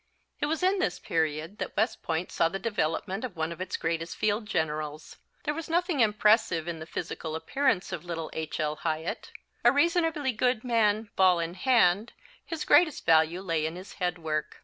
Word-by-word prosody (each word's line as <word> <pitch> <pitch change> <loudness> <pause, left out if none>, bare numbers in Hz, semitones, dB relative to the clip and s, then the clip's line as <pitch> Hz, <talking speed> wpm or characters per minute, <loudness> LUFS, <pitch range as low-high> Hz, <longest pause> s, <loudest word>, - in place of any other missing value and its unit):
It 290 - 0
was 320 +3 -1
in 380 +1 +3
this 180 - 0
period 160 +4 -2
that - - -5
West 220 +4 +1
Point 165 +2 -2
saw 165 - +2
the 195 - -3
development 195 -1 -2
of 240 -7 -5
one 160 +1 -1
of 170 - -7
its 185 - -3
greatest 165 +1 -2
field 210 +1 0
generals. 155 -4 -3 0.3
There 295 - -1
was 325 +1 -6
nothing 345 -2 +1
impressive 210 -6 +3
in 170 -2 -4
the 160 - -8
physical 160 -1 -5
appearance 195 - 0
of - - -4
little 165 -2 -5
H. 160 0 -4
L. 150 -1 -1
Hyatt. 160 +1 -3 0.3
A 240 - +7
reasonably 320 -1 +2
good 245 0 0
man, 220 -3 +1
ball 185 -2 +5
in 165 0 -2
hand, 215 -1 +3 0.3
his 325 -2 -4
greatest 335 -5 +4
value 160 +2 +4
lay 165 -5 -1
in 160 - -6
his 185 +2 -9
head 180 -1 0
work. 155 -2 -3
185 Hz, 190 wpm, -28 LUFS, 160-240 Hz, 0.3 s, A